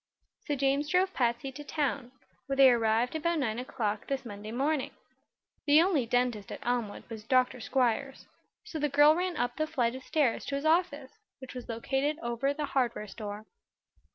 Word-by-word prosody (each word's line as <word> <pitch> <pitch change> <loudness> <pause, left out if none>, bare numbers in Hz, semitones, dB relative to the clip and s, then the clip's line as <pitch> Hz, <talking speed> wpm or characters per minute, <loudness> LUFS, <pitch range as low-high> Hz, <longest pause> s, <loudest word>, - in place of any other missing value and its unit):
So 295 - 0
James 275 +2 +1
drove 370 +2 +2
Patsy 245 +2 0
to 290 +3 -9
town, 280 -4 -2 0.4
where 275 - -1
they 270 -1 +7
arrived 230 +2 +1
about 335 +2 0
nine 235 -6 -1
o'clock 225 -4 -3
this 270 -2 -3
Monday 210 -1 -7
morning. 275 +4 0 0.8
The 290 +1 +7
only 325 -8 +2
dentist 245 -4 0
at - - -8
Elmwood 240 -4 -2
was 220 -2 -8
Dr. 255 +2 +2
Squiers, 260 +2 -1 0.4
so 355 -7 -6
the 295 0 +1
girl 290 +2 +6
ran 360 +1 -2
up 245 +1 -1
the 310 - 0
flight 240 -5 0
of 260 - -7
stairs 280 -6 +1
to 280 - -3
his 280 +2 -3
office, 315 -4 +1 0.3
which 260 -1 -10
was 250 -2 -8
located 270 +6 -1
over 240 +4 0
the 295 +1 -3
hardware 255 -6 -1
store. 205 +1 -7
265 Hz, 180 wpm, -30 LUFS, 235-295 Hz, 0.8 s, they